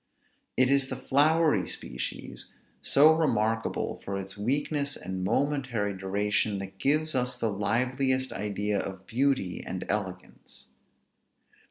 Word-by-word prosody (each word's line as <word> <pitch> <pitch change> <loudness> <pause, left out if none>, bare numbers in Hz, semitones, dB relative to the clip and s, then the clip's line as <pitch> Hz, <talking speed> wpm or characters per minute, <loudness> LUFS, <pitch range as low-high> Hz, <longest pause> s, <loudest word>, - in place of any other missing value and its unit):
It 130 +1 +4
is 140 -1 +4
the 130 - -3
flowery 145 - +3
species, 60 - -5 0.3
so 150 +3 +6
remarkable 115 -8 0
for 100 0 -3
its 95 0 -6
weakness 140 +6 -1
and 95 0 -5
momentary 125 -2 0
duration, 100 +2 0
that 95 0 -7
gives 155 +3 +2
us 125 -1 0
the 115 - 0
liveliest 130 +6 0
idea 105 0 -1
of 95 -1 -5
beauty 125 -6 0
and 95 -1 -5
elegance. 95 -3 -5
115 Hz, 120 wpm, -28 LUFS, 100-140 Hz, 0.3 s, so